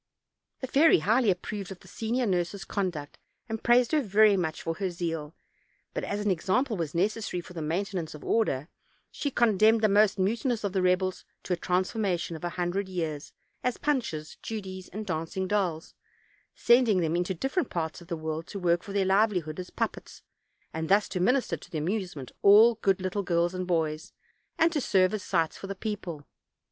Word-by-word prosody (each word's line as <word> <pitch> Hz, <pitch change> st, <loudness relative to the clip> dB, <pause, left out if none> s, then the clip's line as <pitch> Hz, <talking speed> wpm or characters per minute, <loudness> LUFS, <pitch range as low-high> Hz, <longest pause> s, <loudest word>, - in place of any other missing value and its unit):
The 260 Hz, -, -3 dB
fairy 300 Hz, +5 st, +5 dB
highly 220 Hz, +7 st, +2 dB
approved 195 Hz, +1 st, -3 dB
of 190 Hz, -, -9 dB
the -, -, -16 dB
senior 240 Hz, +3 st, -1 dB
nurse's 190 Hz, 0 st, -1 dB
conduct, 175 Hz, -8 st, -3 dB, 0.3 s
and 225 Hz, -1 st, -4 dB
praised 240 Hz, 0 st, +4 dB
her 310 Hz, -2 st, +3 dB
very 210 Hz, -2 st, +5 dB
much 160 Hz, -4 st, -2 dB
for 165 Hz, -, -1 dB
her 195 Hz, -2 st, -1 dB
zeal; 165 Hz, -3 st, -4 dB, 0.6 s
but, -, -, -3 dB
as 205 Hz, -, -2 dB
an 205 Hz, -, +3 dB
example 215 Hz, -, 0 dB
was 165 Hz, -4 st, -4 dB
necessary, 205 Hz, +1 st, 0 dB
for 180 Hz, +1 st, -10 dB
the 165 Hz, -, -5 dB
maintenance 170 Hz, +1 st, -2 dB
of 150 Hz, -, -11 dB
order, 150 Hz, -11 st, +1 dB, 0.4 s
she 285 Hz, -, -2 dB
condemned 220 Hz, -3 st, +4 dB
the 215 Hz, -, +5 dB
most 205 Hz, 0 st, +4 dB
mutinous 230 Hz, +4 st, 0 dB
of 200 Hz, -2 st, -2 dB
the 190 Hz, -, +1 dB
rebels 185 Hz, +1 st, +1 dB, 0.2 s
to 185 Hz, -, -1 dB
a -, -, +2 dB
transformation 180 Hz, -1 st, -1 dB
of 160 Hz, -, -9 dB
a 175 Hz, -, -1 dB
hundred 180 Hz, +3 st, -2 dB
years, 160 Hz, -5 st, -4 dB, 0.3 s
as 250 Hz, -1 st, 0 dB
punches, 230 Hz, -, -2 dB
judies, 190 Hz, -4 st, -6 dB
and 215 Hz, +3 st, -6 dB
dancing 180 Hz, +2 st, -3 dB
dolls; 180 Hz, -6 st, -1 dB, 0.6 s
sending 235 Hz, -6 st, +4 dB
them 165 Hz, 0 st, 0 dB
into 180 Hz, +2 st, -1 dB
different 270 Hz, -, -1 dB
parts 160 Hz, 0 st, -3 dB
of 170 Hz, -, -14 dB
the 170 Hz, -, -3 dB
world 160 Hz, +1 st, -4 dB
to -, -, -7 dB
work 175 Hz, -2 st, +2 dB
for 200 Hz, -, -8 dB
their 200 Hz, -1 st, +2 dB
livelihood 190 Hz, -5 st, +1 dB
as 180 Hz, -, -6 dB
puppets, -, -, -4 dB, 0.5 s
and 160 Hz, 0 st, -3 dB
thus 205 Hz, +2 st, +4 dB
to 185 Hz, -, -3 dB
minister 235 Hz, -2 st, +2 dB
to 155 Hz, -, -15 dB
the 170 Hz, -, -4 dB
amuse 185 Hz, +4 st, -2 dB
ment 130 Hz, -4 st, -8 dB
of -, -, -34 dB
all 215 Hz, +4 st, +8 dB
good 195 Hz, -1 st, +2 dB
little 185 Hz, +2 st, -1 dB
girls 175 Hz, -1 st, +1 dB
and 185 Hz, -1 st, -4 dB
boys, 160 Hz, -3 st, -1 dB, 0.4 s
and 330 Hz, +1 st, +4 dB
to 295 Hz, -, 0 dB
serve 185 Hz, -4 st, +3 dB
as 215 Hz, -, -2 dB
sights 165 Hz, -4 st, 0 dB
for 195 Hz, -, -8 dB
the 195 Hz, -, -5 dB
people. 185 Hz, -8 st, -5 dB
190 Hz, 195 wpm, -28 LUFS, 170-215 Hz, 0.6 s, all